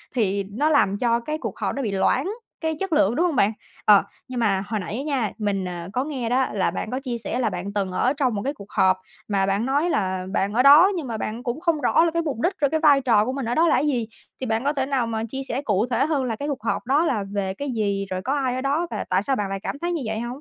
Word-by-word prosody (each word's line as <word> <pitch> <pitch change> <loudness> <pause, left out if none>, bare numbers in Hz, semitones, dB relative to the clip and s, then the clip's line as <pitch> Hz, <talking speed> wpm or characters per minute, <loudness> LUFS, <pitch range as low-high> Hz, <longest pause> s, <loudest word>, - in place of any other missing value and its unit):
thì 200 -3 +1
nó 290 +9 +1
làm 205 -10 +3
cho 235 +1 +2
cái 305 +6 -4
cuộc - - -6
họp - - -1
nó 275 - -2
bị 220 - -2
loãng 195 - +1 0.3
cái 320 -1 -1
chất 385 -4 -2
lượng, 240 -6 +3
đúng 340 - +2
hông 340 -5 0
bạn? 210 -3 +3 0.3
Ờ, 205 -2 +7 0.2
nhưng 255 -1 -4
mà 195 -4 +1
hồi 215 -1 -2
nãy 190 +3 -5
á 270 - -3
nha, 270 -8 -1
mình, 200 -3 -1
ờ, 175 -1 -5
có 255 - 0
nghe 260 -6 -3
đó 260 +1 +2
là 195 - +1
bạn 220 - -4
có 255 - -1
chia 245 -3 -3
sẻ 235 +2 -3
là 235 -4 +1
bạn 190 +1 -5
từng 200 -2 -1
ở 250 +8 +1
trong 265 -6 0
một 200 - -2
cái 280 +2 -1
cuộc 200 -6 -13
họp 185 0 +3 0.3
mà 195 -2 +1
bạn 200 +4 0
nói 285 +6 +1
là 185 - -1
bạn 200 0 0
ở 250 - +3
đó 295 +7 +8
nhưng 315 -6 -4
mà 225 -2 -3
bạn 225 +3 -4
cũng 250 +4 -3
không 330 -4 0
rõ - - +4
là 335 - +1
cái 335 +1 0
mục 295 -8 -3
đích 360 - +2
rồi 285 - +3
cái 315 +2 0
vai 290 -3 +5
trò 220 -5 +3
của 255 - -1
mình 270 -3 -3
ở 240 - -1
đó 335 +1 +4
là - - +4
cái 295 - +1
gì, 240 -6 0 0.3
thì 260 - -1
bạn 225 +1 0
có 285 +2 +1
thể 270 -2 -1
nào 265 -4 0
mà 225 -1 -2
chia 270 +2 -4
sẻ 250 +4 -2
cụ 210 -5 +1
thể 240 - +2
hơn 290 -4 0
là 230 -3 -2
cái 285 +6 -5
cuộc 275 -7 -4
họp 230 - -1
đó 285 +6 +3
là 225 -10 0
về 195 -2 -1
cái 280 +7 -4
gì, 200 -4 -1
rồi 185 0 -3
có 260 +8 -1
ai 265 -3 0
ở 255 - -2
đó 290 +6 0
và - - -3
tại 185 +2 +2
sao 270 - +1
bạn 205 -5 -2
lại 195 0 -3
cảm 280 - -4
thấy 345 +1 -2
như 335 -5 -2
vậy 220 0 -2
hông? 240 - -3
245 Hz, 310 wpm, -23 LUFS, 205-285 Hz, 0.3 s, đó